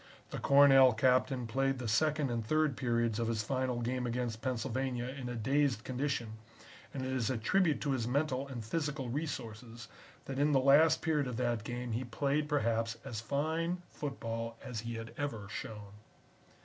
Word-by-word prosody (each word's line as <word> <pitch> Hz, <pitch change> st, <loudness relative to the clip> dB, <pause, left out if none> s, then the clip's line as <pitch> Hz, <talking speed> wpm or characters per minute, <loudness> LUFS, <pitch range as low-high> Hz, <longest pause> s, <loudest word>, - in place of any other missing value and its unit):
The -, -, -4 dB
Cornell 135 Hz, -2 st, +7 dB
Captain 125 Hz, +1 st, +2 dB
played 135 Hz, +4 st, 0 dB
the 125 Hz, -2 st, -4 dB
second 150 Hz, +4 st, +2 dB
and 115 Hz, -1 st, -1 dB
third 155 Hz, +4 st, +1 dB
periods 115 Hz, -2 st, 0 dB
of 115 Hz, -, 0 dB
his 115 Hz, -2 st, -1 dB
final 130 Hz, 0 st, -1 dB
game 125 Hz, +1 st, -1 dB
against 120 Hz, -2 st, -2 dB
Pennsylvania 130 Hz, -1 st, -2 dB
in 130 Hz, -2 st, -6 dB
a 120 Hz, -, -4 dB
dazed 130 Hz, 0 st, +1 dB
condition, 125 Hz, -4 st, -3 dB, 0.5 s
and 130 Hz, -2 st, -4 dB
it 130 Hz, -, -2 dB
is 125 Hz, -4 st, 0 dB
a 130 Hz, -, 0 dB
tribute 160 Hz, -, +2 dB
to 145 Hz, -, 0 dB
his 120 Hz, -4 st, -1 dB
mental 140 Hz, 0 st, 0 dB
and 120 Hz, -5 st, -6 dB
physical 150 Hz, -1 st, -2 dB
resources 115 Hz, -5 st, -5 dB, 0.4 s
that 135 Hz, 0 st, -4 dB
in 145 Hz, +1 st, +3 dB
the 135 Hz, -, +5 dB
last 140 Hz, +5 st, +5 dB
period 150 Hz, -4 st, +1 dB
of 125 Hz, -2 st, -4 dB
that 120 Hz, -3 st, 0 dB
game 120 Hz, +1 st, -4 dB
he 115 Hz, +3 st, -1 dB
played 140 Hz, +4 st, -1 dB
perhaps 115 Hz, -5 st, 0 dB
as 115 Hz, -6 st, -4 dB
fine 160 Hz, +7 st, -1 dB
football 115 Hz, -5 st, -4 dB
as 120 Hz, -3 st, -5 dB
he 115 Hz, +1 st, -5 dB
had 115 Hz, 0 st, -7 dB
ever 115 Hz, -9 st, -3 dB
shown. 105 Hz, -1 st, -7 dB
125 Hz, 175 wpm, -33 LUFS, 115-140 Hz, 0.5 s, Cornell